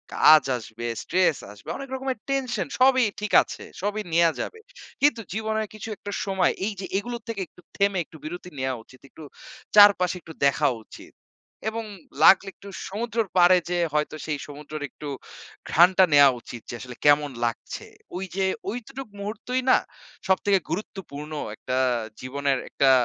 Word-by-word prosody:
কাজ 155 0 +7
আসবে, 115 +1 -8 0.2
stress 180 -5 +2
আসবে 105 +1 -12
অনেক 275 -1 -8
রকমের 265 -1 -3
টেনশন 245 - -1
সবই 260 -2 +5 0.2
ঠিক 210 - -3
আছে। - - -9 0.2
সবই 210 +1 -1
নেয়া 170 -1 +5
যাবে। 445 - -6 0.4
কিন্তু 285 -5 +3
জীবনের 220 0 -1
কিছু 215 +1 -8
একটা 205 - -7
সময় 190 -2 +2
এই 215 - -2
যে, - - -4
এগুলোর 235 +2 -4
থেকে 205 -4 -3
একটু 180 - -20 0.2
থেমে 200 -2 +2
একটু 160 - -14
বিরতি 175 +3 -6
নেয়া 130 0 0
উচিত। 130 - -19
একটু 160 - -13 0.5
চারপাশে 200 -4 +7
একটু 160 - -11
দেখা 140 - +3 0.2
উচিত। - - -14 0.6
এবং 225 0 -4 0.4
লাগলে 195 +2 +7
একটু 200 - -14 0.2
সমুদ্রের 225 +1 -2
পাড়ে 180 +1 +7
যেয়ে 175 -1 +1
হয়তো 150 +1 0
সেই 150 -2 -2
সমুদ্রের 150 +1 -7
একটু 150 - -10 0.6
ঘ্রানটা 180 +4 +6
নেয়া 145 -1 +9
উচিত 120 0 -9
যে - - -5
আসলে 125 -1 -8
কেমন 145 -1 +5
লাগছে। 115 - -4 0.3
ঐযে 190 +1 -2 0.2
ঐটুকুই 245 +2 -6
মুহূর্তই 225 +5 -3
না - - +7 0.5
সবথেকে 195 +1 +3
গুরুত্বপূর্ণ 165 -6 -6 0.2
একটা 130 +3 -3 0.4
জীবনের 135 +1 -1
একটা 135 - +3
190 Hz, 155 wpm, -25 LUFS, 150-215 Hz, 0.6 s, নেয়া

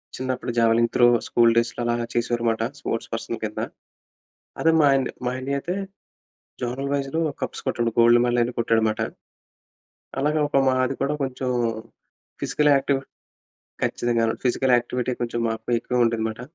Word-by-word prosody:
చిన్నప్పుడు 130 -1 -3
javelin 115 0 +4
throw 120 -1 +5 0.2
school 115 -1 +4
డేస్‌లో 115 +1 0
అలా 120 0 +1 0.2
చేసేవారన్నమాట 120 -1 0 0.2
స్పోర్ట్స్ 115 - -3
పర్సన్ 115 0 -3
కింద. 105 0 -3 1.0
అదే 165 - +4
మా 145 - +5
అన్-మా 125 -1 -2
అన్నయ 140 +2 -2
అయితే 175 +6 -3 0.9
జోనల్ 125 +3 -3
వైస్‌లో 140 +3 -1 0.2
కప్స్ - - -4
కొట్టాడు. 120 -1 0
గోల్డ్ 120 +1 +6
మెడల్ 120 0 +1
అయన్నీ 120 +1 -1
కొట్టాడు 115 -1 +2
అన్నమాట. 110 0 0 1.2
అలాగ 150 +2 +1
ఒక 140 - +2
మాది 130 0 +1
కూడా 140 +2 0
కొంచెం 130 -1 -2 0.9
ఫిజికల్ 150 -1 +2
యాక్టివి 135 0 +1 0.8
ఖచ్చితంగా. 120 -1 +1 0.2
ఫిజికల్ 130 +1 +2
యాక్టివిటీ 125 +1 -2
కొంచెం 120 0 -2
మాకు 110 0 -4
ఎక్కువ 125 0 +1
ఉంటుందన్నమాట. 110 0 -1
120 Hz, 140 wpm, -24 LUFS, 115-130 Hz, 1.2 s, గోల్డ్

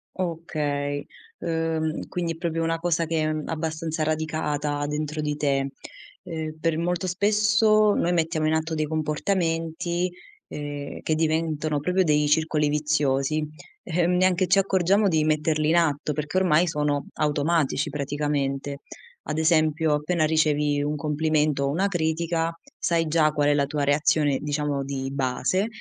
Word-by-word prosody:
Okay. 150 -5 -2 0.3
Uhm, 160 -1 -1
quindi 170 -2 -2
è - - -11
proprio 165 -1 -2
una 165 0 0
cosa 170 -1 0
che, 155 -1 0
mhmm, 155 -1 -4
abbastanza 160 0 -3
radicata 150 -2 -1
dentro 150 +1 -3
di 150 -1 -1
te. 140 -2 0 0.5
Ehm, 160 -3 -5
per 165 0 0
molto 175 +2 -1
spesso 210 +2 +3
noi 175 - +1
mettiamo 165 -2 0
in 155 - +2
atto 160 +1 -1
dei 155 0 0
comportamenti, 165 +2 -1 0.4
ehm, 145 -1 -6
che 155 - 0
diventano 155 -1 0
proprio 180 +5 +1
dei 150 -3 +2
circoli 150 0 +2
viziosi, 150 0 0 0.4
ehm. 175 0 +1
Neanche 185 0 +3
ci 185 +3 +4
accorgiamo 195 +2 +2
di 160 -4 +2
metterli 155 0 +1
in 170 - +4
atto, 150 -3 +1
perché 150 +4 -3
ormai 180 -2 +3
sono 150 -3 -1
automatici 150 0 0
praticamente. 140 -1 -2 0.4
Ad 150 - -4
esempio, 160 -1 +2
appena 155 +2 +1
ricevi 150 -2 +2
un 150 +1 -1
complimento 150 -1 +1
o 140 - +1
una 180 +8 +1
critica, 165 -2 0 0.3
sai 165 -1 +1
già 155 -1 +3
qual 145 -1 +1
è - - +4
la 145 -1 +2
tua 145 0 -2
reazione, 145 -1 +2
diciamo 145 -1 -1
di 135 -1 -4
base 140 - 0
155 Hz, 145 wpm, -25 LUFS, 150-165 Hz, 0.5 s, ci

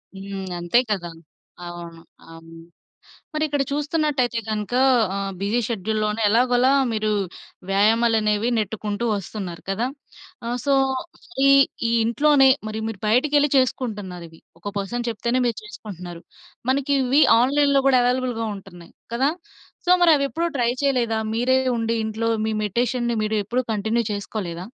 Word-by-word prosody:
హ్మ్. 195 -1 -6
అంతే 175 +7 +3
కదా! 175 -4 -2 0.6
అవును. 170 -1 -9 0.3
అవును. 165 0 -13 0.8
మరిక్కడ 300 -2 0
చూస్తున్నట్టయితే 290 -5 0
గనుక 215 +2 -3 0.4
ఆహ్, 195 0 -3
బిజీ 210 +5 0
షెడ్యూల్‌ 220 -1 -2
లోనే 210 +1 -1
ఎలాగోలా 245 +3 +3 0.2
మీరు 215 0 -1 0.6
వ్యాయామాలనేవి 215 +1 +2
నెట్టుకుంటూ 210 +1 -3
వస్తున్నారు 190 -3 -6
కదా! 220 +5 -1 0.6
ఆహ్, 240 +1 -1
సో, 280 - +2 0.7
ఈ - - +6 0.4
ఈ - - 0
ఇంట్లోనే 270 +3 +4 0.2
మరి 215 0 -5
మీరు 205 -4 -7
బయటికెళ్ళి 290 +6 +3
చేసుకుంటున్నారవి. 200 -10 -2 0.2
ఒక 205 +3 -6
పర్సన్ 240 +5 -3
చెప్తేనే 235 +2 -1
మీరు 235 -3 -1
చేసుకుంటున్నారు. 180 -5 -9 0.5
మనకివి 275 +1 +2 0.2
ఆన్‌లైన్‌లో 280 +2 +3
గూడా 255 -2 +5
అవైలబుల్‌గా 245 -2 0
ఉంటున్నాయి 175 -3 -14 0.2
కదా? 270 +5 +2 0.6
సో, - - +2
మరివి 300 -5 +5
ఎప్పుడూ 335 +1 -1
ట్రై 240 -1 +2
చేయలేదా? 240 -5 +1
మీరే 255 +3 +2 0.2
ఉండి 230 0 -1
ఇంట్లో 225 +1 -2 0.2
మీ 220 - -1
మెడిటేషన్‌ని 240 +3 -1
మీరెప్పుడూ 215 +4 -1
కంటిన్యూ 220 +3 0
చేసుకోలేదా? 190 -4 -5
225 Hz, 125 wpm, -22 LUFS, 200-255 Hz, 0.8 s, ఈ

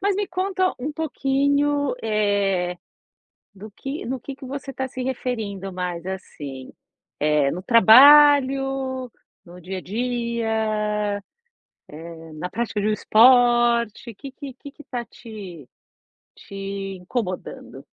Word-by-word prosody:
Mas 400 0 +1
me 410 0 -1
conta 370 0 0
um 290 +4 -4
pouquinho, 285 -1 0
eh, 200 -4 0 0.8
do 205 +2 -11
que 275 +8 -6
no 260 +2 -3
que 270 +3 -8
que 275 -1 -11
você 275 +1 -6
tá 265 0 -4
se 255 0 -7
referindo 220 -7 -4
mais, 180 -2 -4
assim, 145 -8 -7 0.5
eh, 150 -2 +2
no 180 - -5
trabalho, 270 +2 +6 0.3
no 175 +1 -13
dia 185 +2 -6
a - - -6
dia, 220 -2 -2 0.9
eh, 165 -1 -12
na 180 +4 -5
prática 225 -1 -2
de 210 - 0
um - - +2
esporte. 240 0 +4
Que 275 +7 -9
que 275 -1 -9
que 280 +2 -11
que 295 - -15
tá 245 -2 -5
te 200 - -11 0.7
te 195 0 -6
incomodando? 185 0 -6
230 Hz, 125 wpm, -23 LUFS, 195-270 Hz, 0.9 s, trabalho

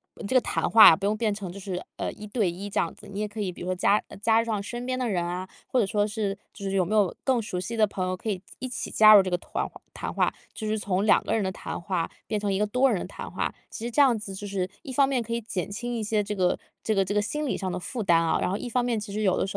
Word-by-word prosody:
呃， - - -10
这 260 - -1
个 - - +8
谈 - - -1
话 220 -7 +10
不 195 - -4
用 210 +1 +1
变 215 -2 +1
成 200 -3 -6
就 195 - -9
是， 185 -2 -4
呃， - - -2
一 210 - -10
对 205 -4 +1
一 190 +4 -6
这 - - 0
样 165 - 0
子。 - - -14
你 195 - -5
也 210 - -1
可 210 +1 -6
以 190 -3 -1
比 175 - -12
如 180 - -5
说 185 - 0
加 200 +3 +3 0.2
加 225 +1 +4
上 220 -3 -2
身 240 +4 -5
边 255 0 -1
的 250 -2 -1
人 175 -4 0
啊， 180 +2 -4 0.2
或 255 - +1
者 225 - +3
说 205 +1 +1
是 205 -2 -2 0.2
就 - - -10
是 195 - -1
有 185 -2 +3
没 210 +5 -1
有 205 -4 +3
更 260 -3 +2
熟 185 -4 -4
悉 230 +6 -4
的 220 -1 +5
朋 185 -2 -3
友 185 - -1
可 200 +4 -5
以 190 -4 -2 0.2
一 255 - -4
起 250 - -5
加 215 0 +8
入 200 - +9
这 185 - -2
个 180 - +1
团 - - -3 0.3
谈 - - -5
话， - - +1 0.2
就 220 - -6
是 215 +1 0
从 195 -1 0
2 215 - +5
个 - - -1
人 220 - +1
的 190 - -1
谈 - - -6
话 175 -1 -2 0.2
变 215 - -1
成 205 -1 -1
一 - - +1
个 210 - +3
多 250 +6 +3
人 195 - 0
的 - - -5
谈 - - -8
话。 - - -2 0.2
其 - - -8
实 240 - -3
这 290 - +4
样 260 -5 +5
子 205 -2 -7
就 205 +2 -6
是 190 -2 -2
一 265 - -7
方 275 +1 +4
面 260 -3 +1
可 230 0 -4
以 235 - -1
减 200 -5 -4
轻 240 +4 -4
一 225 - -2
些 210 0 +1
这 210 +1 -4
个 180 -2 +2 0.3
这 220 - +1
个 195 -1 +3
这 195 - -2
个 210 - +3
心 300 +9 -2
理 275 - 0
上 190 -2 -3
的 180 - -3
负 235 +6 -5
担 175 -5 +4
啊， 165 - +1
然 180 - +1
后 195 - -1
一 - - -5
方 245 +1 +1
面 235 -3 0
其 205 -1 -7
实 215 - -2
有 190 -3 +2
205 Hz, 345 characters per minute, -26 LUFS, 190-225 Hz, 0.3 s, 话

